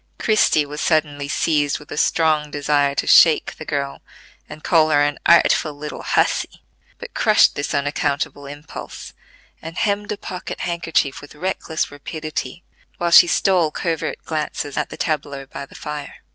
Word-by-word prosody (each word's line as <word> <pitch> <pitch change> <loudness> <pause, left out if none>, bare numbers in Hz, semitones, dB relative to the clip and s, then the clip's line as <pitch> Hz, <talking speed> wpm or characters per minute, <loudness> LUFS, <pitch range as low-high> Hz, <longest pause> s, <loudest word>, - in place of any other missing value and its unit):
Christie 215 -8 +3
was 150 +1 -7
suddenly 145 -3 0
seized 145 -1 +1
with 150 - -15
a - - -4
strong 155 -1 +1
desire 145 -1 +1
to - - -1
shake 160 -3 +5
the 155 - -8
girl 140 -2 -3 0.5
and 150 +1 -10
call 160 -2 +3
her 145 -1 +4
an 145 0 -1
"artful 160 -2 +4
little 150 +1 -7
hussy," - - 0 0.3
but - - -10
crushed - - +4
this 145 - -4
unaccountable 145 0 -2
impulse, 145 +2 -9 0.5
and 165 +2 -8
hemmed 205 -1 -1
a 210 - -3
pocket 185 -2 -7
handkerchief 165 -5 -1
with 145 +1 -13
reckless 170 -1 -3
rapidity, 155 +1 -6 0.3
while 175 0 -1
she 175 - +9
stole 180 -2 +2
covert 165 +1 -3
glances 150 -2 -3
at - - -2
the - - -9
tableau 145 -3 -3
by 140 +1 -8
the - - -17
fire. 150 -1 -7
150 Hz, 160 wpm, -20 LUFS, 145-165 Hz, 0.5 s, she